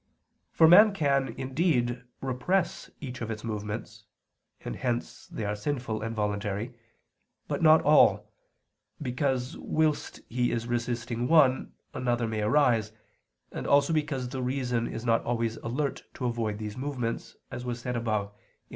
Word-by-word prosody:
For 160 - +6
man 205 +5 +8
can, 140 -5 +2
indeed, 130 -3 0 0.2
repress 150 +8 -1
each 130 -3 -6
of 115 - -3
its 110 -1 -5
movements 105 0 -5 0.6
(and - - -4
hence 120 -1 -3
they 110 - -5
are 105 +1 -1
sinful 120 -1 -3
and 115 +1 -4
voluntary), 105 +2 -2 0.7
but - - -2
not 160 -1 +6
all, 105 -8 +4 0.7
because 130 -1 -1
whilst 155 -1 -1
he 120 +1 0
is 115 -1 -2
resisting 120 0 -2
one, 135 -4 +4 0.2
another 120 -2 0
may 110 -1 -2
arise, 115 -2 +3 0.6
and - - -5
also 140 +2 +4
because 145 -5 -1
the 130 0 -4
reason 125 -2 -1
is 115 +1 -6
not 115 -1 +2
always 115 -1 -1
alert 140 +5 -3
to 130 - -4
avoid 115 -3 -1
these 105 -1 -5
movements, 125 -4 -3 0.2
as 120 - -5
was 120 -1 -4
said 125 +1 -3
above 110 -3 -1
(Q. 105 - -33
120 Hz, 145 wpm, -28 LUFS, 115-135 Hz, 0.7 s, man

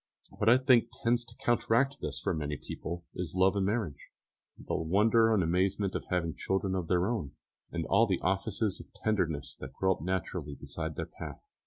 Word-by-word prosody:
What 105 - +1
I 120 - +8
think 130 -3 +4 0.2
tends 120 +1 +3
to 115 - -14
counteract 120 +4 +2
this - - -3
for - - -1
many 75 -2 -2
people 85 +4 -6
is 90 -2 -4
love 95 +1 +4
and 95 -1 +1
marriage, 100 -9 -2 0.5
the - - -6
wonder 110 +7 +4
and 105 -4 +3
amazement 95 +3 +1
of - - -3
having 85 -3 -1
children 95 0 -1
of 90 -3 -2
their 90 0 +2
own, 100 - -2 0.4
and 85 -2 -2
all 115 - +4
the 95 -3 +1
offices 95 +2 0
of - - -12
tenderness 85 -10 -1
that 65 0 -8
grow 95 +6 +1
up - - -11
naturally 85 -4 -3
beside 80 +3 -5
their - - -3
path. - - -9
95 Hz, 190 wpm, -31 LUFS, 85-110 Hz, 0.5 s, I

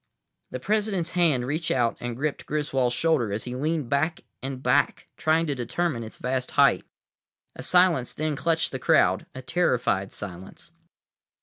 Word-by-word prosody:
The 130 - -5
President's 205 - 0
hand 160 -9 +2
reached 155 +5 -2
out 120 -2 +1
and 120 -1 -4
gripped 145 +3 -3
Griswold's 135 -5 0
shoulder 150 -10 +1
as 105 +2 -2
he 125 - -5
leaned 150 +1 -1
back 160 +8 0 0.2
and 130 0 -5
back, - - +2
trying 160 +1 +2
to 145 - -1
determine 130 +1 -2
its 110 - -9
vast 130 0 -2
height. - - +5 0.7
A - - -7
silence 180 -8 +3
then 155 -1 -2
clutched 165 +2 0
the 130 - -4
crowd—a 130 +1 +2
terrified 125 - +1
silence. 95 - -9
140 Hz, 150 wpm, -26 LUFS, 125-165 Hz, 0.7 s, height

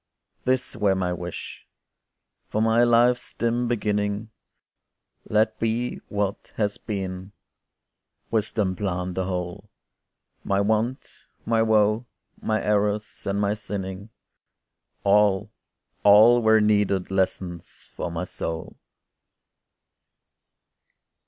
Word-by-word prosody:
This 130 0 0
were 105 -3 +2
my 90 -1 -1
wish!—from 90 +4 -8
my 115 +1 +4
life's 120 +1 +3
dim 120 +1 0
beginning 105 -1 -1 1.0
Let 110 +1 +2
be 115 +2 -1
what 100 -1 -2
has 105 -2 -1
been! 95 -2 -5 1.0
wisdom 105 -3 0
planned 90 -2 -2
the 95 +1 -2
whole 90 -2 -4 0.7
My 100 0 +1
want, 110 +5 -1 0.2
my 115 -1 +2
woe, 110 +1 +3 0.3
my 110 0 0
errors, 105 0 0
and 100 +1 0
my 100 0 +1
sinning, 100 -1 -6 0.9
All, 100 -1 +3 0.5
all 110 +4 +7
were 110 -1 +5
needed 105 -3 +2
lessons 95 -3 -3
for - - -3
my 85 +1 -3
soul. 80 -2 -5
105 Hz, 95 wpm, -25 LUFS, 95-110 Hz, 1.0 s, all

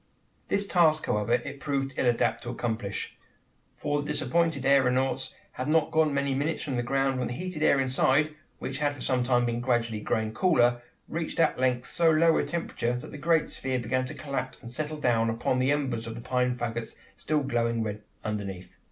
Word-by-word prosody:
This 200 0 +2
task, 160 -5 +3
however, 105 +2 0
it 125 +3 -1
proved 135 -1 -2
ill - - +1
adapted 115 -1 +2
to - - -4
accomplish: 115 -4 -3 0.6
for 145 0 -1
the 145 - -6
disappointed 145 0 0
aeronauts 135 -1 +2 0.2
had 130 - -4
not 155 0 +2
been 160 0 +4
gone 150 - -1
many 140 -1 +1
minutes 145 +4 -1
from 140 -4 -3
the 120 - +1
ground, 135 +1 0
when 125 - -1
the 120 - -4
heated 180 -1 -5
air 140 - +4
inside, 135 +3 +2 0.2
which 135 +1 -5
had 145 -1 0
for 135 - -11
some 125 0 +1
time 120 -1 +2
been 120 0 -1
gradually 120 -3 0
growing 110 0 -1
cooler, 120 -6 +3 0.3
reached 165 0 -4
at 165 - +3
length 125 -1 +1
so 170 -1 +3
low 160 +1 +5
a - - +1
temperature, 125 -7 -2
that - - -10
the - - -7
great 160 +2 +2
sphere 130 -1 -2
began 130 +1 -1
to - - -6
collapse 140 -3 -4
and 115 - -8
settle 155 +4 -3
down 115 -5 +2
upon 115 +3 0
the 130 +2 +2
embers 130 -6 -1
of 115 - -5
the 120 - -7
pine 125 0 0
faggots 120 -1 -3 0.2
still 155 0 0
glowing 115 -3 0
red 105 -1 -4 0.2
underneath. 100 -4 -5
130 Hz, 205 wpm, -28 LUFS, 120-145 Hz, 0.6 s, low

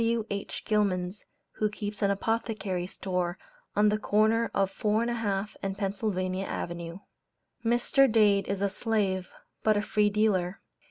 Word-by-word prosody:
W.H. 225 -3 -2
Gilman's, 200 -2 0 0.3
who 215 - 0
keeps 210 0 -5
an 200 - +3
Apothecary 200 -3 -1
store 180 -2 -2 0.4
on 210 +1 +5
the 210 +1 +1
corner 220 +2 +3
of 195 -1 +1
4 215 +3 +1
1/2 215 -4 -1
and 195 0 -3
Pennsylvania 195 -2 -1
Avenue. 170 +1 -5 0.6
Mr. 240 +3 +4
Dade 205 -3 +4
is 200 0 -1
a - - +4
slave, 195 -3 0 0.3
but 215 -1 +3
a - - +2
free 210 -1 +2
dealer. 200 -3 +1
205 Hz, 140 wpm, -29 LUFS, 190-220 Hz, 0.6 s, on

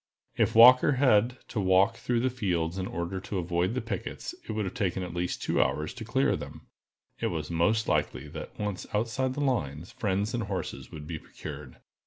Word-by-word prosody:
If 115 - +1
Walker 125 +4 +8
had 125 -2 +3
to 110 - -2
walk 95 0 +4
through 120 -1 0
the 130 +1 +1
fields 90 -7 -1
in 95 - -2
order 85 +3 -3
to 95 +1 -5
avoid 90 +4 0
the 130 - 0
pickets, 110 -5 -5 0.2
it - - -1
would 105 -4 -2
take 95 -5 0
at 90 -2 -4
least 90 0 -2
two - - +2
hours 75 0 0
to 120 - -7
clear 130 +5 +2
them. 75 -1 -8 0.5
It - - 0
was 80 -1 -3
most 105 +7 +2
likely - - 0
that, - - -8
once 105 -3 -3
outside 125 +4 0
the 145 - -2
lines, 85 - -1
friends 100 +1 -1
and 120 - -1
horses 95 -4 -4
would 75 -2 -8
be 80 0 -5
procured. - - -9
100 Hz, 195 wpm, -28 LUFS, 85-115 Hz, 0.5 s, Walker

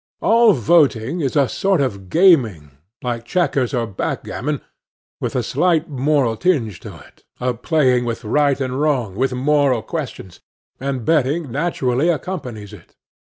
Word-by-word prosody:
All 230 -1 +5
voting 135 - +2
is 135 -1 -2
a 140 -3 +3
sort 195 - 0
of 100 -9 -3
gaming, 120 - +3 0.3
like 120 -2 -3
chequers 135 -3 0
or 120 -3 -1
backgammon, 125 +6 -4 0.6
with - - -4
a - - 0
slight 170 -3 +1
moral 135 -3 +1
tinge 120 - 0
to - - -10
it, - - -20 0.2
a 125 0 0
playing 125 -1 +1
with 120 0 -4
right 140 +4 +2
and 130 0 -2
wrong, 130 -10 0
with 130 +6 0
moral 135 -3 +2
questions; 90 -1 -6 0.4
and 130 -3 -3
betting 150 -1 +1
naturally 140 -1 0
accompanies 125 - -4
it. 100 - -15
135 Hz, 145 wpm, -19 LUFS, 115-155 Hz, 0.6 s, All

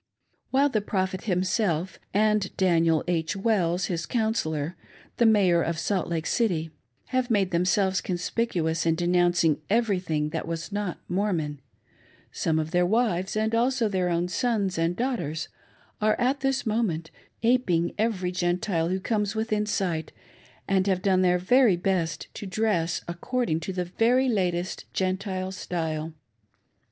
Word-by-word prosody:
While 275 +2 +3
the 215 -5 0
Prophet 190 -1 -2
himself, 185 -2 0
and 210 -1 +2
Daniel 165 -4 +3
H. 165 0 0
Wells, 195 -4 +1
hia 175 -3 -2
coun 220 -2 +1
sellor, 160 -6 -2 0.4
the 235 - +5
Mayor 190 -6 +4
of 170 0 -1
Salt 185 +3 -1
Lake 165 -2 -2
City, 170 -9 0 0.4
have 255 -1 0
made 200 -5 +2
themselves 185 +2 +2
conspicuous 175 -3 -1
in 165 - +3
denouncing 175 -2 +2
everything 185 -9 +1
that 160 +1 -4
was 165 +3 -4
not 205 -3 -2
Mormon, 175 -7 -1 0.7
some 160 -1 0
of 160 0 -2
their 180 0 +3
wives, 190 -2 +1
and 220 +1 0
also 240 0 +2
their 185 -3 0
own 170 +1 0
sons 205 -1 0
and 165 +1 +1
daughters, 230 - -2 0.5
are 215 0 +2
at 260 +3 +1
this 270 -1 0
moment 205 -8 -1 0.3
aping 190 -9 +2
every 200 -5 0
Gentile 175 -1 0
who 190 +1 0
comes 210 +1 -1
within 215 -1 0
sight, 170 -6 -1 0.6
and 190 0 +2
have 185 -2 +1
done 190 -2 +3
their 180 -1 +3
very 225 +3 +4
best 175 -3 -1
to 205 - -7
dress 180 -6 0
according 170 0 -1
to 165 +4 -5
the 180 -1 -2
very 240 +8 +2
latest 180 -5 -1
Gentile 190 0 -1
style. 160 -4 -3
185 Hz, 145 wpm, -26 LUFS, 170-215 Hz, 0.7 s, the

